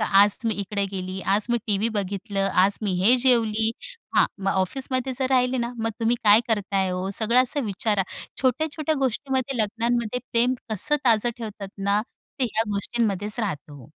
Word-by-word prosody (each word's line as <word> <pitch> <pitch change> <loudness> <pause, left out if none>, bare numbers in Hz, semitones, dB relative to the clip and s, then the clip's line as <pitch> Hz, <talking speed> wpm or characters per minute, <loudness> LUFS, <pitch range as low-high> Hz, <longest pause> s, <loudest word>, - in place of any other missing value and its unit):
तर 215 - +2
आज 200 +1 +5
तुम्ही 220 -3 -1
इकडे 200 0 -2
गेली 185 0 -5
आज 210 +2 0
मी 240 - +2
टीव्ही 210 +2 +1
बघितलं 200 -1 -2 0.2
आज 200 - +2
मी 200 -3 0
हे 240 +6 +6
जेवली 225 -3 +3 0.5
हां. - - +6
मग 195 0 -1
ऑफिसमध्ये 255 +7 -1
जर 260 - +1
राहिले 255 0 +2
ना 235 0 -2
मग 225 0 -1
तुम्ही 230 +1 +2
काय 210 +2 +7
करताय 195 -3 0
हो 180 +1 -3
सगळं 235 +3 +4
असं 260 +3 +1
विचारा. 205 0 0 0.4
छोट्या-छोट्या 310 +4 0
गोष्टींमध्ये 265 +1 -1
लग्नांमध्ये 235 +2 -1
प्रेम 240 +2 +3 0.2
कसं 295 +9 +2
ताजं 235 -1 +3
ठेवतात 210 -4 -7 0.2
ना 200 +1 +2 0.4
ते - - +3
ह्या 225 -2 0
गोष्टींमध्येच 210 +1 0
राहतं 155 -8 -4
हो. 140 -4 -12
220 Hz, 170 wpm, -24 LUFS, 200-245 Hz, 0.5 s, काय